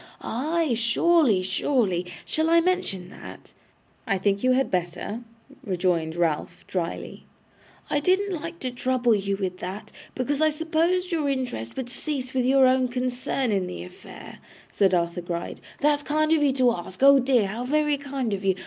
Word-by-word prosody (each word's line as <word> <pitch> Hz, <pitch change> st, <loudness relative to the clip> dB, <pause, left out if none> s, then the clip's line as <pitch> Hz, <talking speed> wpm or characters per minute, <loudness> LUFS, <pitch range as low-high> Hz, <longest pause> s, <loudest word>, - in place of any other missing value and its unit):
Ay, 310 Hz, +4 st, -1 dB
surely, 235 Hz, -, +3 dB
surely. 190 Hz, -2 st, 0 dB, 0.2 s
Shall 315 Hz, +1 st, 0 dB
I 335 Hz, 0 st, +6 dB
mention 335 Hz, -, -1 dB
that?' -, -, -12 dB, 0.5 s
'I 195 Hz, -3 st, +1 dB
think 200 Hz, +2 st, 0 dB
you 255 Hz, 0 st, +4 dB
had 265 Hz, +1 st, +1 dB
better,' 180 Hz, +5 st, -3 dB, 0.4 s
rejoined 175 Hz, -6 st, 0 dB
Ralph, 165 Hz, -3 st, -1 dB
drily. 175 Hz, -3 st, -4 dB, 0.7 s
'I 290 Hz, -, +2 dB
didn't 380 Hz, +5 st, +1 dB
like 335 Hz, +1 st, -6 dB
to 255 Hz, -, -3 dB
trouble 245 Hz, -1 st, +1 dB
you 200 Hz, -1 st, -1 dB
with 185 Hz, -2 st, -3 dB
that, 190 Hz, +4 st, -7 dB, 0.2 s
because 275 Hz, +3 st, -1 dB
I 315 Hz, -, +5 dB
supposed 330 Hz, +4 st, 0 dB
your 310 Hz, -4 st, 0 dB
interest 250 Hz, -, -3 dB
would 260 Hz, -2 st, -3 dB
cease 270 Hz, -3 st, -4 dB
with 255 Hz, -1 st, +1 dB
your 270 Hz, 0 st, +5 dB
own 255 Hz, 0 st, +3 dB
concern 250 Hz, 0 st, -2 dB
in 190 Hz, -3 st, 0 dB
the 85 Hz, -1 st, -6 dB
affair,' 90 Hz, -, -12 dB, 0.3 s
said 190 Hz, -2 st, +3 dB
Arthur 170 Hz, 0 st, -1 dB
Gride. 170 Hz, 0 st, -5 dB, 0.2 s
'That's 295 Hz, 0 st, +3 dB
kind 310 Hz, +2 st, 0 dB
of 320 Hz, -2 st, +4 dB
you 285 Hz, -2 st, +4 dB
to 255 Hz, -2 st, +3 dB
ask. 185 Hz, +5 st, -6 dB
Oh 275 Hz, 0 st, +8 dB
dear, 250 Hz, -4 st, +3 dB
how 215 Hz, +5 st, -4 dB
very 295 Hz, +2 st, +1 dB
kind 270 Hz, -5 st, -3 dB
of 195 Hz, 0 st, -3 dB
you! 190 Hz, -1 st, +2 dB
255 Hz, 170 wpm, -25 LUFS, 190-290 Hz, 0.7 s, Oh